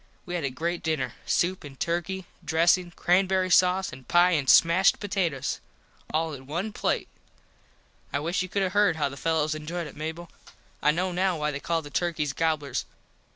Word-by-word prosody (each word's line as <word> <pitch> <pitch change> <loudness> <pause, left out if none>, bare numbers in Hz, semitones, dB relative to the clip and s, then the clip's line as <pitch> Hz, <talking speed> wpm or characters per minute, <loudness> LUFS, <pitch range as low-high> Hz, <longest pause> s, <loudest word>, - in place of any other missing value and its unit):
We 175 - -6
had 175 -2 -2
a 140 - 0
great 170 +7 -3
dinner. 140 -7 -1
Soup 180 +2 +1
an 140 -2 -10
turky, 175 +6 -2 0.2
dressin, 170 +2 +3
crambury 185 +1 +2
sause 185 -1 +4
an 130 0 -11
pie 175 +1 +4
an 145 -6 +1
smashed 170 +7 +5
potatoes. 180 -9 -1 0.5
All 160 0 0
in 130 -1 -10
one 180 +8 -3
plate. - - -1 1.0
I - - 0
wish 165 +6 -1
you 185 - -4
could 200 +1 0
have 185 -1 -1
heard 205 -4 +4
how 150 -2 0
the 140 - -9
fellos 155 0 0
enjoyed 165 +3 -4
it 150 - -10
Mable. 160 +3 -6 0.5
I - - +3
know 180 +4 +1
now 180 0 +1
why 150 0 -1
they 140 - -4
call 165 +2 -1
the 145 - -10
turkys 155 -5 -1
gobblers. 155 -2 -1
170 Hz, 185 wpm, -27 LUFS, 150-180 Hz, 1.0 s, smashed